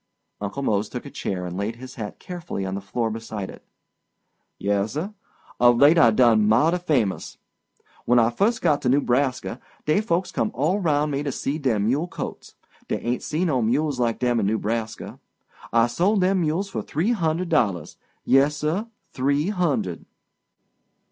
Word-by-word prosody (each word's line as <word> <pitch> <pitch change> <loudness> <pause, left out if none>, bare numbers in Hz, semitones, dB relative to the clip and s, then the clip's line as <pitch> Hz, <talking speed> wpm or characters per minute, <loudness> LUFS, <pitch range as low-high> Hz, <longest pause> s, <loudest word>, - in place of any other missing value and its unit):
Uncle 105 +7 -4
Mose 105 -4 0
took - - -6
a - - -8
chair 90 -2 -3
and 90 0 -5
laid 100 +4 -2
his 130 +2 -10
hat 105 -4 -6
carefully 175 - -5
on 95 - -3
the 100 - -3
floor 110 +3 -2
beside 110 -3 -5
it. - - -14 0.9
"Yessir; 110 - -1 0.5
of 120 0 +6
late 150 +6 +6
I 120 - +7
done 110 -2 +4
mouty 150 +11 +3
famous. 130 - -1 0.7
When 120 - +4
I 115 0 +4
first 220 - +1
got 145 - +3
to 125 - +1
Newbraska, 130 -2 +1 0.3
dey 155 +7 +3
folks 185 -4 -1
come 110 - 0
all 160 +10 +1
roun' 150 -4 +1
me 140 0 -1
to 145 -1 -2
see 140 +4 -3
dem 115 -8 +1
mule 140 +9 +1
colts. - - -7 0.3
Dey - - -1
ain't 120 +1 -2
see 160 +4 -1
no 135 -8 +1
mules 135 +4 0
like 120 -2 +1
dem 120 -2 +1
in 100 - +1
Newbraska. 110 +1 -3 0.5
I 115 0 +4
sold 185 - +1
dem 185 0 +2
mules 165 +5 0
for - - -4
three 170 +10 -1
hundred 170 -4 0
dollars. 100 - 0 0.3
Yessir—three 150 - +1
hundred. 140 - -1
130 Hz, 165 wpm, -24 LUFS, 110-160 Hz, 0.9 s, I